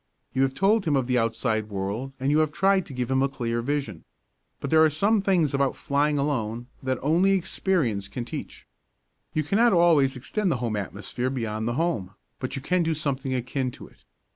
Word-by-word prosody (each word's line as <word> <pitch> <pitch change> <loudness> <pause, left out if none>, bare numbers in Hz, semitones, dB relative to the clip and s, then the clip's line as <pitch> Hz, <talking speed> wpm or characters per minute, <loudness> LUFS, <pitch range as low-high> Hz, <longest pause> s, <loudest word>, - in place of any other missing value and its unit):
You 130 - +1
have 135 0 +1
told 200 +2 +3
him 150 -3 +2
of 135 -2 +1
the 125 0 +2
outside 110 -1 -1
world 100 +7 -3
and 135 +2 +1
you 150 - +4
have 155 -1 +2
tried 190 +2 +2
to 140 - -9
give 125 0 -2
him 130 0 +3
a 135 - +2
clear 120 -3 -2
vision. 135 - -3 0.6
But - - -5
there 160 0 +6
are 160 - +5
some 200 +8 +2
things 180 -7 +2
about 140 -1 +1
flying 145 +1 +1
alone 120 -5 -1 0.2
that 130 -1 -1
only 175 +7 +3
experience 160 - 0
can 120 +2 -5
teach. - - -7 0.7
You 155 - +2
cannot 220 +9 +3
always 160 -6 +4
extend 185 - -1
the 135 - +1
home 120 -3 -2
atmosphere 105 +5 -3
beyond 115 -4 -3
the 120 - 0
home, 130 - -1 0.2
but 130 - -4
you 135 - -5
can 180 +3 +1
do 165 -1 0
something 135 -3 -2
akin 125 +1 -2
to - - -11
it. - - -26
135 Hz, 205 wpm, -26 LUFS, 120-160 Hz, 0.7 s, there